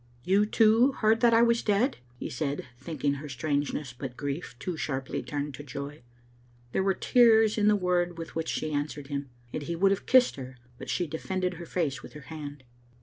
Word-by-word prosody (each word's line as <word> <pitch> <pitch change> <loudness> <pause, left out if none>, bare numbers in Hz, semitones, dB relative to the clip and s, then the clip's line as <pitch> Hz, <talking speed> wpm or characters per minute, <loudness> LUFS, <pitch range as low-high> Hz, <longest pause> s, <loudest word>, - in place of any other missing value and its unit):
"You, 200 +3 +3
too, 225 +5 +5
heard 220 -2 +3
that 240 -1 +6
I 230 - +6
was 235 0 +3
dead?" 215 +6 +1 0.2
he - - -5
said, 140 +2 -3
thinking 145 0 -1
her 145 +1 -6
strangeness 140 0 -2
but 125 0 -7
grief 145 0 -4
too 180 +6 -4
sharply 135 -3 -3
turned 145 0 -4
to 145 - -8
joy. 140 +2 -7 0.7
There - - +1
were 190 0 +2
tears 225 -3 +5
in 210 -1 +2
the 210 - +6
word 180 -2 0
with 165 0 -7
which 165 0 -2
she 155 - -2
answered 145 -1 -3
him, 140 -1 -3 0.2
and - - -2
he 170 +4 -3
would 195 +3 +4
have 195 - -2
kissed 255 - +5
her, 130 -1 -8 0.2
but - - -8
she 180 - 0
defended 180 +4 -2
her 170 -1 -9
face 150 -6 -1
with - - -12
her 150 - -9
hand. 145 -3 -7
160 Hz, 205 wpm, -28 LUFS, 145-200 Hz, 0.7 s, that